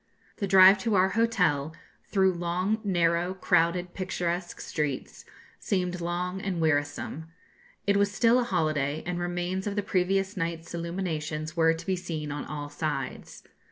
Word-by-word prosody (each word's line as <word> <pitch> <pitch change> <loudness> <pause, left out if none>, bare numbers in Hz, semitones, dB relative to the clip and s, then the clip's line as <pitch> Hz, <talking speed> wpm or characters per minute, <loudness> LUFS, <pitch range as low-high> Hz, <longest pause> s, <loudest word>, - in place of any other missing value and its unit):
The 200 - -2
drive 190 +1 +8
to 220 +1 0
our 190 0 +4
hotel, 180 -9 +1 0.3
through 190 -2 +3
long, 180 +5 -1
narrow, 175 -1 +1
crowded, 175 0 +1
picturesque 180 -2 -3
streets, 150 -4 -4 0.3
seemed 180 -2 -1
long 180 +2 -2
and 190 -3 -2
wearisome. 155 0 -1 0.6
It 200 0 +3
was 200 0 +2
still 230 +4 +4
a - - +2
holiday, 155 - 0
and 175 0 -2
remains 175 +2 -2
of 200 - -2
the 205 - 0
previous 195 +2 0
night's 165 -2 -4
illuminations 165 -3 -3
were 165 -1 +4
to 165 +1 -9
be 190 - +1
seen 160 -5 -5
on 145 0 -4
all 145 -1 -5
sides. 145 -3 -4
175 Hz, 150 wpm, -28 LUFS, 160-190 Hz, 0.6 s, drive